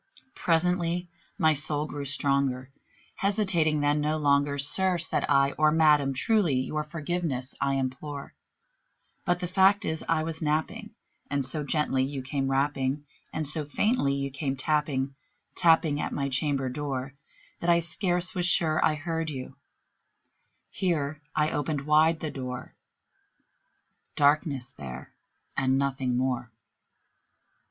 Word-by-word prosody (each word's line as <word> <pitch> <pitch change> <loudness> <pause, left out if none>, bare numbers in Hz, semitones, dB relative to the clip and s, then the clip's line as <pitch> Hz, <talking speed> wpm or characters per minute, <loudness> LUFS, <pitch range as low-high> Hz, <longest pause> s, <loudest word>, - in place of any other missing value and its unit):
Presently 175 +1 0 0.3
my 155 0 +4
soul 150 +1 +1
grew 145 -2 -6
stronger; 140 -2 0 0.5
hesitating 190 -7 +1
then 145 +1 +2
no 155 +1 0
longer, 140 -1 +2
"Sir," 175 +7 +2
said 165 -1 0
I, 140 -1 +4
"or 155 0 +5
Madam, 150 -3 +4
truly 195 - +2
your 150 +4 -1
forgiveness 155 -4 -3
I 140 0 +1
implore; 135 +2 -4 0.9
But 175 +1 +1
the 180 - -1
fact 195 +3 +4
is 160 0 -2
I 160 -1 +2
was 160 0 -5
napping, 155 0 -2 0.3
and 140 -2 0
so 150 +3 -1
gently 145 -2 +1
you 135 0 -4
came 135 0 -2
rapping, 135 +1 0 0.3
And 155 - -3
so 150 +2 -2
faintly 145 - +1
you 140 0 -3
came 135 0 -2
tapping 140 -1 0 0.4
tapping 160 -3 +3
at - - -3
my 140 -1 -2
chamber 135 0 0
door, 135 0 -4 0.5
That 170 - -1
I 170 0 +5
scarce 175 +1 -1
was 180 -1 +1
sure 160 -3 +3
I 155 - +3
heard 165 +1 -3
you" 135 -2 -7 1.2
here 155 -6 -1
I 150 0 +2
opened 145 -1 -2
wide 155 +2 +4
the 155 - -3
door: 125 -2 -6 1.4
Darkness 145 -3 +2
there 65 - -9 0.4
and 130 0 +2
nothing 135 -2 0
more. 125 -1 -1
150 Hz, 135 wpm, -27 LUFS, 135-160 Hz, 1.4 s, or